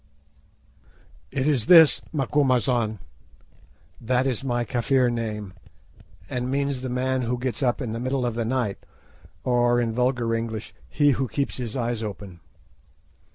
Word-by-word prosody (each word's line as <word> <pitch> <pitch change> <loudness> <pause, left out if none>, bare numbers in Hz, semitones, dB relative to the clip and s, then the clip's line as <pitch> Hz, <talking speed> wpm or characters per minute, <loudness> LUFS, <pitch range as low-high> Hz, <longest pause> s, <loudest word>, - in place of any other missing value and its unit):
"It 130 +6 -2
is 130 -7 +1
this, 165 -5 +8
'Macumazahn.'" 130 -6 +1 1.0
That 125 +2 +1
is 135 -1 -1
my 120 -2 0
Kafir 125 +2 +1
name, 105 -4 -4 0.7
and 125 +4 -3
means 140 -1 -1
the 130 - -4
man 130 +1 0
who 125 +1 -1
gets 125 -2 -3
up 125 -3 +1
in 115 - -4
the 115 - -4
middle 130 +1 -1
of 120 - -1
the 115 +1 -2
night, 115 -4 -1 0.6
or, 120 -1 +2
in 115 -2 0
vulgar 125 -1 0
English, 115 -1 -4 0.2
he 145 -1 +3
who 135 0 0
keeps 140 +4 -2
his 125 -1 -4
eyes 120 -2 -2
open. 100 -4 -7
125 Hz, 145 wpm, -24 LUFS, 115-130 Hz, 1.0 s, this